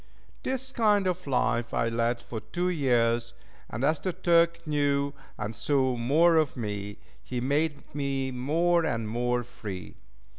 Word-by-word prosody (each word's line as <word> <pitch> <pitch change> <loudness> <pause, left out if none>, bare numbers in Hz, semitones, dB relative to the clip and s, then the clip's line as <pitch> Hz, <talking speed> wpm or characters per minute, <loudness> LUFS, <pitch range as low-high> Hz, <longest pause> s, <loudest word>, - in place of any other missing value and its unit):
This 265 0 -3
kind 210 -5 +3
of 180 -3 -2
life 120 -3 0
I 115 - +2
led 115 +1 0
for 115 - -5
two 175 +10 -2
years, 120 -7 +1 0.3
and 120 - -4
as 155 +1 +2
the 185 - -2
Turk 170 -1 +3
knew 140 -2 +1 0.2
and 105 +1 -4
saw 130 0 +1
more 155 +8 +4
of 155 -5 +1
me, 105 -2 -4 0.2
he 125 - -4
made 145 +4 0
me 135 -2 -1
more 165 +7 +2
and 115 -8 -1
more 120 +2 0
free. 105 -7 -8
135 Hz, 150 wpm, -28 LUFS, 120-165 Hz, 0.3 s, more